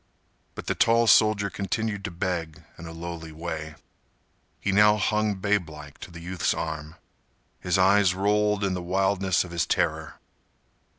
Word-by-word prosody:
But -, -, -7 dB
the -, -, 0 dB
tall 115 Hz, +1 st, +3 dB
soldier 105 Hz, -2 st, +4 dB
continued 100 Hz, +1 st, -3 dB
to -, -, -2 dB
beg 85 Hz, -3 st, -4 dB
in 85 Hz, -, -10 dB
a -, -, -8 dB
lowly 80 Hz, -1 st, -7 dB
way. 80 Hz, -1 st, -6 dB, 0.8 s
He 100 Hz, -, -1 dB
now 105 Hz, +2 st, +5 dB
hung 105 Hz, 0 st, 0 dB
babelike 85 Hz, -8 st, -3 dB
to -, -, -9 dB
the 85 Hz, -1 st, -11 dB
youth's 90 Hz, +1 st, -1 dB
arm. 80 Hz, -1 st, -5 dB, 0.6 s
His 90 Hz, +1 st, 0 dB
eyes 95 Hz, 0 st, +4 dB
rolled 105 Hz, +1 st, +1 dB
in 95 Hz, -1 st, 0 dB
the 90 Hz, -, -3 dB
wildness 95 Hz, +1 st, +1 dB
of 90 Hz, -, -10 dB
his 85 Hz, -3 st, -1 dB
terror. -, -, -1 dB
95 Hz, 155 wpm, -26 LUFS, 85-100 Hz, 0.8 s, now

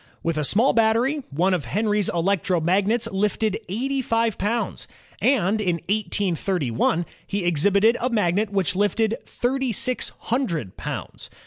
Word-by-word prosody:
With 165 Hz, -1 st, 0 dB
a 155 Hz, -, -1 dB
small 220 Hz, -, +4 dB
battery, 235 Hz, +6 st, +2 dB
one 175 Hz, +7 st, +1 dB
of 170 Hz, -8 st, -1 dB
Henry's 210 Hz, -, 0 dB
electromagnets 190 Hz, +4 st, +1 dB
lifted 210 Hz, +2 st, 0 dB
eighty 265 Hz, +7 st, -1 dB
five 230 Hz, -2 st, 0 dB
poimds, 230 Hz, +4 st, -2 dB, 0.3 s
and 220 Hz, -5 st, +2 dB
in 180 Hz, -4 st, +1 dB
183 190 Hz, -, -1 dB
1 160 Hz, +9 st, +1 dB, 0.2 s
he 200 Hz, -2 st, -2 dB
exhibited 200 Hz, +7 st, +3 dB
a 250 Hz, -, +1 dB
magnet 210 Hz, -2 st, +1 dB
which 195 Hz, -3 st, 0 dB
lifted 220 Hz, +4 st, +1 dB
thirty 265 Hz, +1 st, -1 dB
six 250 Hz, +4 st, 0 dB
himdred 175 Hz, -, -1 dB
poimds. -, -, -6 dB
205 Hz, 135 wpm, -23 LUFS, 180-230 Hz, 0.3 s, small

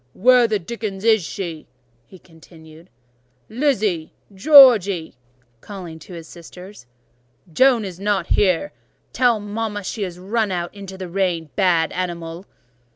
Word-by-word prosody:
"Where 250 Hz, +2 st, +4 dB
the 215 Hz, -1 st, 0 dB
dickens 200 Hz, 0 st, -6 dB
is 220 Hz, -4 st, +3 dB
she!" 165 Hz, -1 st, -7 dB, 0.4 s
he 185 Hz, -, -15 dB
continued. 160 Hz, -1 st, -18 dB, 0.6 s
"Lizzy! 215 Hz, -, -1 dB, 0.2 s
Georgy! 205 Hz, -, +6 dB, 0.5 s
(calling 180 Hz, -6 st, -9 dB
to 180 Hz, -, -13 dB
his 165 Hz, -2 st, -10 dB
sisters) 180 Hz, -2 st, -13 dB, 0.7 s
Joan 250 Hz, +2 st, +3 dB
is 185 Hz, -2 st, -8 dB
not 205 Hz, 0 st, -1 dB
here: 190 Hz, -, +1 dB, 0.4 s
tell 245 Hz, -4 st, +2 dB
mama 205 Hz, 0 st, -5 dB
she 205 Hz, +3 st, -4 dB
is 180 Hz, -2 st, -6 dB
run 210 Hz, +4 st, -2 dB
out 175 Hz, -1 st, -4 dB
into 195 Hz, -2 st, -10 dB
the 185 Hz, -1 st, -7 dB
rain—bad 175 Hz, -2 st, 0 dB
animal!" 175 Hz, 0 st, -5 dB
190 Hz, 125 wpm, -20 LUFS, 170-215 Hz, 0.7 s, Georgy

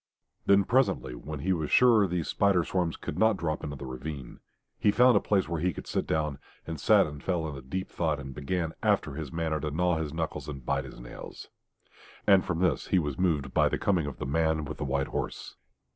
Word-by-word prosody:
Then 100 Hz, 0 st, +6 dB
presently, 120 Hz, -, +1 dB
when 70 Hz, +4 st, -7 dB
he 95 Hz, +4 st, +1 dB
was 80 Hz, -4 st, -2 dB
surer 115 Hz, -5 st, +5 dB
these 85 Hz, -2 st, -2 dB
spider 100 Hz, -4 st, +3 dB
swarms 90 Hz, -3 st, -1 dB
could 75 Hz, -, -5 dB
not 110 Hz, -2 st, +4 dB
drop 80 Hz, -2 st, -2 dB
into 75 Hz, 0 st, -4 dB
the 70 Hz, -, -8 dB
ravine, 65 Hz, 0 st, -7 dB, 0.4 s
he -, -, +3 dB
found 125 Hz, +3 st, +5 dB
a -, -, +6 dB
place 100 Hz, -3 st, +1 dB
where 85 Hz, -2 st, -2 dB
he 90 Hz, 0 st, +1 dB
could -, -, -8 dB
sit -, -, -2 dB
down, 75 Hz, -3 st, -1 dB, 0.3 s
and 80 Hz, -2 st, -5 dB
sat -, -, +5 dB
and 75 Hz, -2 st, -8 dB
fell 85 Hz, -4 st, -1 dB
into 70 Hz, -3 st, -6 dB
deep 95 Hz, +9 st, -4 dB
thought 80 Hz, -4 st, -1 dB
and 70 Hz, -1 st, -7 dB
began 80 Hz, +4 st, -2 dB
after 75 Hz, -, +1 dB
his 75 Hz, -2 st, -6 dB
manner 80 Hz, -2 st, -1 dB
to 75 Hz, -, -2 dB
gnaw 90 Hz, +2 st, +1 dB
his 80 Hz, -2 st, -3 dB
knuckles 80 Hz, 0 st, -4 dB
and 70 Hz, -4 st, -7 dB
bite 70 Hz, 0 st, 0 dB
his 65 Hz, -, -11 dB
nails. -, -, -10 dB, 0.8 s
And 100 Hz, -2 st, +6 dB
from 90 Hz, -1 st, -2 dB
this 90 Hz, -, +1 dB
he 95 Hz, -, +2 dB
was 75 Hz, -6 st, -1 dB
moved 80 Hz, -7 st, 0 dB
by -, -, +4 dB
the -, -, -1 dB
coming 90 Hz, -7 st, +1 dB
of 70 Hz, -, -6 dB
the -, -, -4 dB
man 80 Hz, +2 st, +1 dB
with 75 Hz, -, -7 dB
the 75 Hz, -, -2 dB
white 70 Hz, 0 st, -1 dB
horse. -, -, -4 dB
80 Hz, 225 wpm, -28 LUFS, 70-90 Hz, 0.8 s, Then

